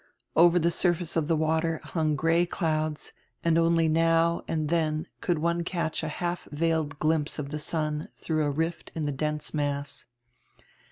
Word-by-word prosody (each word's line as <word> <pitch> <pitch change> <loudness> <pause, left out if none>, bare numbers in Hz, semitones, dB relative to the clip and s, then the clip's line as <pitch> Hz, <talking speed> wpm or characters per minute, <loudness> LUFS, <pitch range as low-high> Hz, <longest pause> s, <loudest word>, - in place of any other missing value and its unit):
Over 170 +2 +6
the 170 0 +3
surface 175 -1 +1
of 160 -3 +1
die 165 - +3
water 160 +1 +1
hung 155 -3 0
gray 165 +4 +2
clouds 155 -3 -2 0.3
and 165 -1 +3
only 165 0 +3
now 165 +1 +3
and 155 -2 -1
then 155 -1 0 0.2
could 175 -2 +1
one 170 +2 0
catch 170 -2 -2
a 160 - -3
half 175 +3 -3
veiled 155 -1 0
glimpse 155 -1 +1
of 145 -2 -4
the 150 +1 -4
sun 150 -1 -2
through 155 -1 -1
a - - +1
rift 160 +4 -2
in 160 -2 -2
die 145 - 0
dense 150 +2 -3
mass. 145 -3 -2
160 Hz, 170 wpm, -27 LUFS, 150-165 Hz, 0.3 s, Over